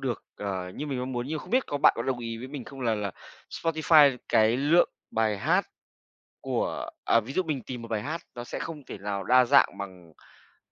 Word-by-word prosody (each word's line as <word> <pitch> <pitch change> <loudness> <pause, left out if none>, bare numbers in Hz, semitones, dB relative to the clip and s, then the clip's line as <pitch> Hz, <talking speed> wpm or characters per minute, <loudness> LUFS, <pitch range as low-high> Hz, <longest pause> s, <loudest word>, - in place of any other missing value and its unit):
được, 125 -4 -3
ờ, 95 -3 -4
như 150 - -5
mình 135 -3 -3
mong 130 +1 -3
muốn 120 +1 -3
nhưng 155 +2 -2
mà - - -8
không - - -13
biết 255 +2 +2
có 145 - -2
bạn - - +6
có 115 - -2
đồng 130 -1 -1
ý 115 -1 -5
với 130 +3 -7
mình 140 -3 -7
không 135 -1 -10
là 115 -3 +1
là 105 -2 -2 0.4
Spotify 155 -4 +4
cái 110 +2 +4
lượng 150 +6 +4 0.2
bài 110 -2 +1
hát - - +2 0.7
của - - -2
à, 115 - +4
ví 115 +5 -8
dụ 185 - +1
mình 145 -7 -2
tìm 125 -2 -7
một 115 - -8
bài 110 -2 -2
hát 160 +4 -4
nó 120 - -6
sẽ - - -5
không 155 -4 -6
thể - - -7
nào 100 -1 -3
đa 125 +3 +6
dạng 100 -4 +4
bằng 100 - -4
bằng 90 -3 -17
YouTube. 80 - -25
125 Hz, 245 wpm, -27 LUFS, 110-145 Hz, 0.7 s, bạn